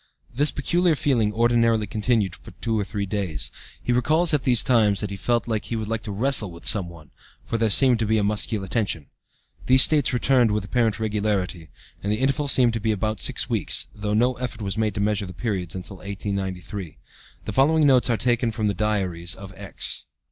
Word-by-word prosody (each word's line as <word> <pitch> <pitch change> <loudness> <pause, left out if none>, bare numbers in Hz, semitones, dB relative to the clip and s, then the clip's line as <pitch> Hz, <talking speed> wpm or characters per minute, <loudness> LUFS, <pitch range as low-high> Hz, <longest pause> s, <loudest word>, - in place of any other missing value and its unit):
This 145 +4 +3
peculiar 170 +3 +1
feeling 120 -7 +1
ordinarily 115 -1 +2
continued 105 -1 0
for - - -14
two 115 -2 -1
or - - 0
three 100 0 -4
days. 95 -6 -2 0.3
He 125 - 0
recalls 155 +7 +3
at 145 - 0
these 120 -3 +3
times 110 -6 +2
that 105 -2 -3
he - - -4
felt 120 +5 0
that 110 -2 -3
he 115 - -4
would 110 -1 -4
like 115 0 -2
to 105 - -7
wrestle 115 0 +2
with 85 0 -13
some 95 -5 +4
one, 80 -4 -15 0.3
for 115 - -3
there 110 -1 +2
seemed 125 +2 +5
to 110 - -1
be 110 +1 +2
a 105 - +1
muscular 105 -1 -1
tension. 95 -8 -2 0.6
These 130 0 +8
states 150 -4 +2
returned 125 -1 +2
with 105 -1 -1
apparent 115 0 0
regularity, 100 -6 -2 0.3
and 100 - -2
the 105 - 0
intervals 135 +3 0
seemed 120 -3 +3
to 115 - -2
be 110 +1 0
about 110 0 -2
six - - 0
weeks, - - 0
though 105 0 -3
no 125 +4 +2
effort 120 -3 -5
was 95 -1 -3
made 110 -1 -1
to - - -3
measure 105 -1 0
the 90 - -9
periods 95 -5 -3
until 95 +1 -7
1893. 95 -2 -5 0.5
The - - -5
following 150 +3 +3
notes 130 -2 +4
are 115 - +1
taken 120 +1 0
from 110 -1 -3
the 105 - +1
diaries 95 -4 -1
of 100 -1 -11
X. - - -1
110 Hz, 210 wpm, -23 LUFS, 100-120 Hz, 0.6 s, These